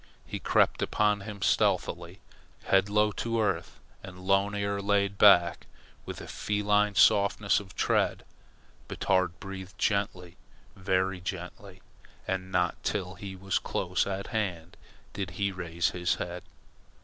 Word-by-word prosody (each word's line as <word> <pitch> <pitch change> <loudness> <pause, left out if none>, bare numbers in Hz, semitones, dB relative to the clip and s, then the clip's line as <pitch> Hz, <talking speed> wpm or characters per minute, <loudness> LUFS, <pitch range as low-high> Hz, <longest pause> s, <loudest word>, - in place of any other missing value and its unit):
He - - -5
crept - - +2
upon 105 -1 +1
him 100 -1 -7
stealthily, - - 0 0.4
head 95 +1 +3
low 105 +1 +3
to 115 +2 -2
earth 95 -5 -1 0.2
and 95 -1 -10
lone 100 +1 +2
ear 100 0 -1
laid 100 0 +1
back, 85 -5 +5 0.4
with - - -6
a - - -9
feline 105 0 +1
softness 100 +1 +4
of 95 -2 -12
tread. - - +1 0.6
Batard 95 -2 0
breathed 95 0 -8
gently, 95 -4 -1 0.4
very 95 0 0
gently, 90 +2 -7 0.4
and 95 0 -3
not 90 -2 0
till 95 -3 -2
he 95 0 -8
was 95 0 -1
close - - -1
at 100 0 -3
hand 90 -6 -3 0.4
did 95 -2 -4
he 100 -1 0
raise 85 -3 -2
his 90 0 0
head. 90 0 -5
95 Hz, 135 wpm, -28 LUFS, 90-100 Hz, 0.6 s, back